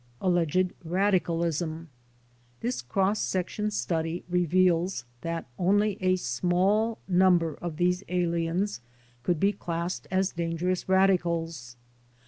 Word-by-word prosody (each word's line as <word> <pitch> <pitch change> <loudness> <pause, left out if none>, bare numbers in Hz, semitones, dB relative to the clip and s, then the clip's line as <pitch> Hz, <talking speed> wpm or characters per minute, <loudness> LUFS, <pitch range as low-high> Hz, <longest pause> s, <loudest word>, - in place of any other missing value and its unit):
Alleged 180 0 +1
Radicalism 170 -3 0 0.7
This 125 0 -2
cross 195 - 0
section 190 +3 -1
study 165 -4 -2
reveals 180 -3 +2 0.2
that 165 0 -3
only 205 +2 +2
a 185 0 +3
small 185 - +1
num 185 -1 +5
ber 165 -2 -2
of 170 -3 -4
these 180 +2 +1
aliens 175 0 0 0.4
could 165 +6 0
be 200 +4 +3
classed 170 0 -4
as 190 +1 +1
dangerous 170 +2 -2
radicals. 170 -8 +1
175 Hz, 110 wpm, -27 LUFS, 165-185 Hz, 0.7 s, num